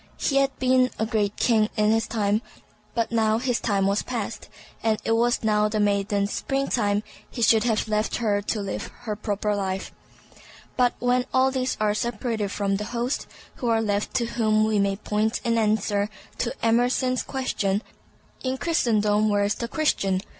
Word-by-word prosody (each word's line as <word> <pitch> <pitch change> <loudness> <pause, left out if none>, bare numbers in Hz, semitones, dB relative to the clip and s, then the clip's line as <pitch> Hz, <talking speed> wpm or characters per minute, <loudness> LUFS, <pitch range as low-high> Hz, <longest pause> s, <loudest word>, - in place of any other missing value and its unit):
He 275 - +1
had 275 0 +2
been 255 0 +3
a 220 - 0
great 210 -3 0
king 220 -3 +2
in 210 0 +3
his 225 0 +1
time, 210 -1 0 0.5
but 230 -1 0
now 220 -1 +2
his 245 0 0
time 200 -4 +1
was 200 +1 +2
past, 230 -3 -5 0.3
and 220 -1 +2
as - - -13
it - - 0
was 235 +1 +2
now 210 -1 +2
the 215 0 -1
maiden's 200 0 +1
spring 275 0 -1
time, 205 -3 +1 0.3
he 235 - -3
should 220 0 +5
have 225 -1 +1
left 215 0 0
her 210 -4 +1
to 210 +1 -2
live 200 - -4
her 220 -3 -3
proper 210 0 -1
life. 190 -1 -3 0.8
But 250 -1 +2
when 250 0 +1
all 260 0 +3
these 260 -1 -1
are 210 -1 +2
separated 230 -2 -2
from 200 -1 -1
the 210 - -4
host, 245 +3 -1 0.3
who 240 - -2
are 225 -1 +3
left 205 0 -1
to 240 -2 +2
whom 215 -2 +1
we 215 -1 +1
may 200 0 +1
point 215 +2 -1
in 230 -1 +1
answer 210 -1 +1 0.3
to 235 -1 -2
Emerson's 245 +2 +2
question, 210 -6 -1 0.6
"In 260 0 -1
Christendom, 215 -9 +2
where 205 -1 +2
is 205 +1 +1
the 235 - -4
Christian?" 195 - 0
220 Hz, 180 wpm, -25 LUFS, 205-240 Hz, 0.8 s, should